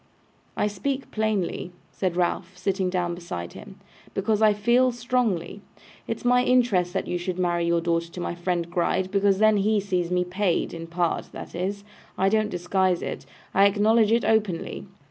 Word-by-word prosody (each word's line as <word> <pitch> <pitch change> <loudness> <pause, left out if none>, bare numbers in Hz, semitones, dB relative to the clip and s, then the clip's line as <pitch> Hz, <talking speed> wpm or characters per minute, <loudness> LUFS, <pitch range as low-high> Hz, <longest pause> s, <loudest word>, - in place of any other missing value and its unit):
'I - - +2
speak 260 +7 -3
plainly,' 210 -5 -1 0.2
said 180 -3 -2
Ralph, 180 +1 -1
sitting 190 0 0
down 180 -1 -1
beside 130 - -6
him, - - -11 0.4
'because 210 +2 +1
I 215 -1 +6
feel 235 +5 +3
strongly. 230 -7 -1 0.5
It's 225 - -4
my 250 0 +4
interest 240 -9 +3
that - - -1
you 175 - -2
should 180 0 -3
marry 175 -2 0
your 170 0 +2
daughter 170 0 0
to - - -7
my 175 - -2
friend 175 -1 -2
Gride, 185 +1 0
because 200 -1 +3
then 215 0 +4
he 210 +2 +2
sees 180 -3 -1
me 180 0 +1
paid 180 -1 0
in 165 0 -7
part, 170 0 -1
that - - -8
is. 195 +3 -3 0.3
I 190 +1 +3
don't 215 0 +1
disguise 180 0 0
it. - - -5 0.3
I 195 +1 +6
acknowledge 215 +2 +3
it 235 +1 +3
openly. 185 - 0
190 Hz, 175 wpm, -25 LUFS, 175-215 Hz, 0.5 s, I